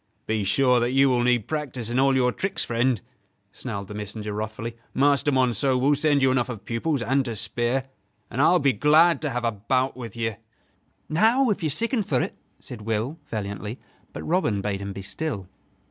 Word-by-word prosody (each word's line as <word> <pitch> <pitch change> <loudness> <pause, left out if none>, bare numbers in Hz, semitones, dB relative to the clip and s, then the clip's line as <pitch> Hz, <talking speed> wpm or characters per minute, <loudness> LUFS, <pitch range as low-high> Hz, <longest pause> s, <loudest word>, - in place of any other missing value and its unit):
"Be 110 -1 0
sure 125 +5 +3
that 120 +2 0
you 135 0 +5
will 125 -1 +2
need 120 -3 +2
practice 130 -7 -3
in 125 - +1
all 135 0 +4
your 125 -1 +3
tricks, 195 +7 -2
friend," 120 0 +1 0.5
snarled 100 -1 -6
the 105 - -8
messenger, 105 0 -5
wrathfully; 110 +2 -4 0.2
"Master 145 +1 +3
Monceux 130 0 +2
will 140 +3 +3
send 145 -1 +2
you 130 - +4
enough 130 -1 +1
of 110 -4 -7
pupils 120 +3 -1
and 135 +3 +2
to 115 -3 -3
spare! 120 +5 0 0.5
And 130 - 0
I 150 - +6
will 180 - +5
be 140 -5 +2
glad 155 +9 +4
to 155 - -1
have 125 -2 -2
a 115 - +2
bout 130 +5 0
with 120 -4 -8
you." 115 -1 -2 0.7
"Now, 225 +9 +3
if 200 - -2
you 160 - 0
sicken 230 - 0
for't," 140 -10 -1 0.3
said 120 -3 -8
Will, 115 +8 -2
valiantly; 105 +1 -4 0.3
but - - -7
Robin 160 - +1
bade 100 0 -2
him 100 0 -4
be 95 0 -7
still. 105 -4 -4
125 Hz, 195 wpm, -25 LUFS, 110-145 Hz, 0.7 s, I